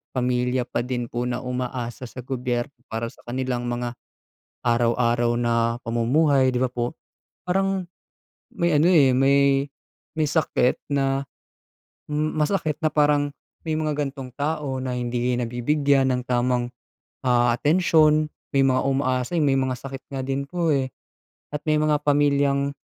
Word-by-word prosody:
pamilya 125 0 +1
pa - - -2
din 120 -1 -3
po 120 +1 -2
na 125 +1 -3
umaasa 125 -1 -4
sa 125 +1 -9
gobyerno 125 0 -2 0.2
para 115 +1 -3
sa - - -23
kanilang 125 -1 -2
mga 120 0 -3 0.7
araw-araw 120 0 +2
na 115 0 +1
pamumuhay 130 +4 +2
di 125 - -1
ba - - +3
po? 120 -1 -3 0.5
Parang 195 0 +1 0.7
may 170 -3 +1
ano 155 +4 +4
eh, 140 -6 +6
may 140 +1 +3 0.5
may 155 -1 +1
sakit 145 -5 +1
na 135 0 +1 0.9
masakit 155 +2 0
na - - +5
parang 145 -1 +3 0.4
may 160 -1 -1
mga 155 -2 -1
gantong 135 -2 -9
tao 145 -3 -2
na 130 -1 -3
hindi 120 0 -1
nabibigyan 135 +3 +1
ng 125 - -4
tamang, 125 0 0 0.6
ah, 120 -1 +4
atensyon, 155 0 +3 0.2
may 135 - +5
mga 130 -1 +3
umaasa, 130 +2 0
yung 150 -3 +2
may 135 - +2
mga 130 -1 0
sakit 135 0 -8
nga 130 - -2
din 135 +1 -2
po 170 -2 0
eh. 130 -2 0 0.6
At 150 - -4
may 155 -1 +2
mga 155 -1 +3
pamilyang 140 -1 +2
130 Hz, 145 wpm, -24 LUFS, 125-150 Hz, 0.9 s, eh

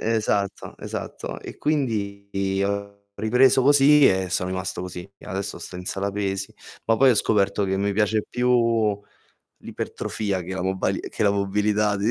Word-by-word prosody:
Esatto, 105 -3 -1
esatto. - - -6
E - - -9
quindi 100 -8 -1
ho 100 0 -4
ripreso 125 +4 +4
così 145 +1 +6
e 95 -1 +1
sono 90 0 -1
rimasto 95 -1 -3
così. 90 +1 -7
E - - -16
adesso 100 +1 -4
sto 90 - -8
in 90 - -7
sala 100 +2 -2
pesi, 100 -1 -3 0.3
ma 115 0 +3
poi 135 +1 +6
ho - - +4
scoperto 100 -2 +1
che 95 0 0
mi 100 +1 0
piace 105 +1 +1
più 115 -4 +2 0.6
l'ipertrofia 100 -4 -3
che 95 +2 -6
la 95 - -3
mobali 95 0 -1
che - - -4
la 100 - +4
mobilità, 105 +1 +1
100 Hz, 160 wpm, -24 LUFS, 95-110 Hz, 0.6 s, così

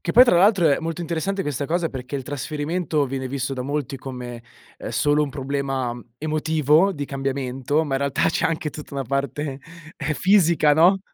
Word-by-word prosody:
Che 170 - -2
poi 250 +3 +9
tra 210 - +4
l'altro 190 -1 +5
è 140 - +3
molto 165 +1 -4
interessante 175 +4 -2
questa 145 -2 -3
cosa 170 +1 0
perché 130 0 -7
il 135 - -2
trasferimento 150 +3 -2
viene 130 0 -4
visto 135 0 -3
da 130 -2 -3
molti 140 -1 -3
come, 125 -2 -7 0.3
ehm, - - -6
solo 145 +1 +2
un 150 - -1
problema 135 -2 -2 0.3
emotivo 155 +3 +2
di 145 -4 -4
cambiamento, 135 +1 -1
ma 135 - -2
in 135 - +1
realtà 140 -1 +1
c'è - - +1
anche 160 -2 -2
tutta 150 -1 -9
una 135 - -1
parte 140 +2 -2 0.4
ehm, 155 - -2
fisica, 170 -1 +4
no, 175 +6 +5
145 Hz, 190 wpm, -23 LUFS, 135-160 Hz, 0.4 s, poi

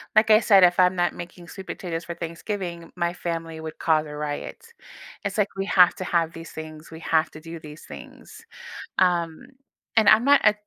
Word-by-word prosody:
Like 215 +1 +5
I 215 - +8
said, 200 -4 +5
if 175 0 +5
I'm 180 0 +5
not 175 -2 +1
making 175 0 -10
sweet 190 +2 -10
potatoes 170 -2 -5
for 170 -1 -6
Thanksgiving, 170 0 -5
my 170 0 -1
family 165 -2 -5
would 160 0 -7
cause 155 -1 +2
a 150 - -8
riot. 150 - -5 0.6
It's 200 0 -3
like 205 -2 +2
we 195 0 -2
have 180 -3 +5
to - - -5
have 170 -2 0
these 165 0 -10
things. 155 0 -9
We 160 - -9
have 160 -1 +1
to 155 - -11
do 165 +1 -9
these 150 0 -12
things. - - -12 0.6
Um, 170 -3 +1 0.5
and 220 -2 +5
I'm 215 +2 +7
not, 285 +1 +5
e 210 - +6
170 Hz, 200 wpm, -24 LUFS, 160-190 Hz, 0.6 s, I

